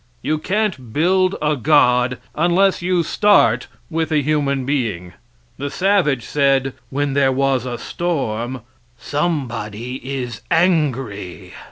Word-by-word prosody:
You 155 0 0
can't 185 - -2
build 185 +5 +2
a 150 0 +2
God 125 -3 +3 0.2
unless 175 +5 +2
you 175 -1 +1
start 205 +5 +3 0.2
with 160 -1 -2
a 150 -2 +2
human 140 -3 0
being. 110 -11 -2 0.5
The 140 +1 -3
savage 180 - +1
said, 135 -2 +1 0.2
when 140 0 -1
there 135 -1 +3
was 130 -1 0
a 120 -1 -4
storm, 130 -8 -3 0.4
"Somebody 125 -6 -3
is 130 -3 -5
angry." 135 - 0
140 Hz, 120 wpm, -19 LUFS, 125-165 Hz, 0.5 s, God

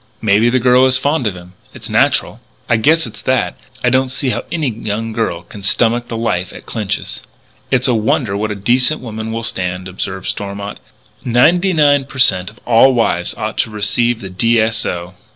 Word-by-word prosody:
"Maybe 110 +2 +3
the 130 - +2
girl 125 +1 +4
is 130 0 +2
fond 145 -4 0
of 100 - -3
him. 90 0 -13 0.2
It's - - -7
natural." - - +1 0.3
"I 120 - +3
guess 160 +8 +3
it's - - -10
that. 130 -1 0 0.2
But - - -6
I - - +3
don't 130 0 +2
see 130 0 -1
how - - -3
any 160 -4 -1
young 110 0 -4
girl 100 -7 -2
can 100 +4 -12
stomach 120 +4 +1
the 115 - -5
life 95 -6 -1
at - - -12
Clinch's." 105 -4 -3 0.5
"It's 130 0 +2
a 125 - +2
wonder 115 -1 0
what 105 +2 -2
a 105 - -3
decent 125 +8 +1
woman 110 -2 -5
will 115 +1 -3
stand," 90 -3 -2
observed 95 0 -5
Stormont. 100 0 -5 0.4
"Ninety 165 +11 +3
nine 145 -4 +3
per 135 - -12
cent. 95 -8 +4
of 110 - -19
all 125 +3 +5
wives 90 -7 0
ought 110 +1 -4
to - - +1
receive 110 +3 0
the 95 -2 -7
D. 115 +5 +2
S. 115 +1 0
O." 90 +1 -5
115 Hz, 205 wpm, -16 LUFS, 100-130 Hz, 0.5 s, all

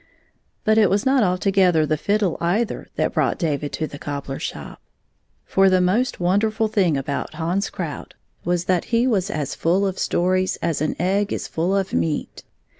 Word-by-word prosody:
But 220 -1 +4
it 210 -4 +5
was 200 +6 +1
not 265 0 +4
altogether 180 -3 +3
the 155 - +1
fiddle 200 +3 0
either 205 +7 -1
that - - 0
brought - - +1
David 150 -4 -2
to 160 - -2
the 145 -2 -9
cobbler 140 -2 -5
shop. - - -7 0.6
For 195 0 +4
the 185 0 +3
most 200 +8 +1
wonderful 215 +5 +1
thing 190 -8 +2
about 140 +3 -4
Hans 175 +5 -1
Krout 165 -6 -6 0.3
was 175 0 0
that 180 -2 +1
he 235 +1 +1
i6 - - +2
was 195 -4 0
as 150 -8 -3
full 185 +4 +1
of 190 -1 -2
stories 185 +1 +1
as 165 -4 -1
an 155 - 0
egg 195 +4 +1
is - - -3
full 175 +4 -1
of 195 -1 -2
meat. 155 -2 -2
185 Hz, 185 wpm, -22 LUFS, 160-205 Hz, 0.6 s, it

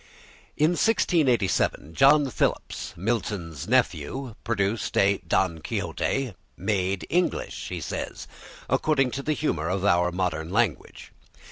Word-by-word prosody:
In 155 +3 +4
1687 135 - +1
John 140 - +5
Phillips, - - -2
Milton's 95 - -3
nephew, 120 - 0
produced 110 -1 -1
a 100 0 +4
"Don 85 -1 +1
Quixote" 130 - -2 0.2
"made 95 -4 -1
English," 180 +1 -1
he - - -4
says, - - -5 0.4
"according 135 -5 +2
to 140 - -3
the 155 +2 0
humour 85 - -1
of 95 +1 -1
our 90 -2 +3
modern 85 -3 -2
language." 100 - -1
100 Hz, 115 wpm, -26 LUFS, 90-135 Hz, 0.4 s, John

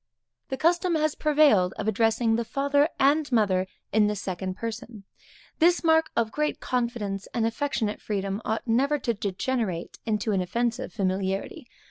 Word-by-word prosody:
The 265 - -3
custom 345 +2 +2
has 310 -1 +1
prevailed 285 -12 +3
of 215 - -3
addressing 225 +1 +2
the 235 - 0
father 280 +5 +1
and 285 +1 +3
mother 195 -5 +2 0.3
in 215 0 +4
the 210 - -1
second 185 -1 -4
person. 225 -1 -6 0.6
This 345 +2 +4
mark 320 -1 +4
of 225 -2 +1
great 300 +4 -1
confidence, 235 -6 -2
and 230 -2 +1
affectionate 225 -2 -2
freedom, 195 0 -3
ought 220 - -2
never 270 +6 +2
to 235 -4 -1
degenerate 205 -2 -3
into 215 0 0
an 195 -2 +1
offensive 235 +7 -2
familiarity. 195 - -2
230 Hz, 150 wpm, -26 LUFS, 200-280 Hz, 0.6 s, in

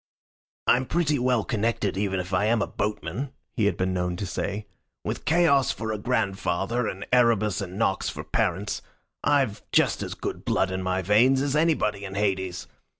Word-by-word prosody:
"I'm 130 +1 +3
pretty 155 -4 +1
well 125 -3 +2
connected 110 -3 -1
even 95 -1 0
if 90 +1 -5
I 95 +3 +2
am 115 +1 +3
a - - 0
boatman," 105 - -3 0.2
he 115 -3 +1
had 100 - +1
been 95 0 0
known 90 -1 -1
to 100 - -4
say. 100 +3 -3 0.4
"With - - -4
Chaos 155 -5 +4
for 110 0 -2
a 105 - -3
grandfather, 100 0 0
and 95 0 -5
Erebus 110 -5 +3
and 95 0 -6
Nox 100 -3 +1
for - - -6
parents, 100 +4 -1 0.4
I've 140 -8 +2
just - - +3
as - - -4
good - - -5
blood 95 - +1
in 95 0 -2
my 95 0 -1
veins 120 +8 +4
as 140 0 0
anybody 145 -11 +1
in 95 0 -6
Hades. 95 -3 -1
105 Hz, 180 wpm, -26 LUFS, 95-125 Hz, 0.4 s, Chaos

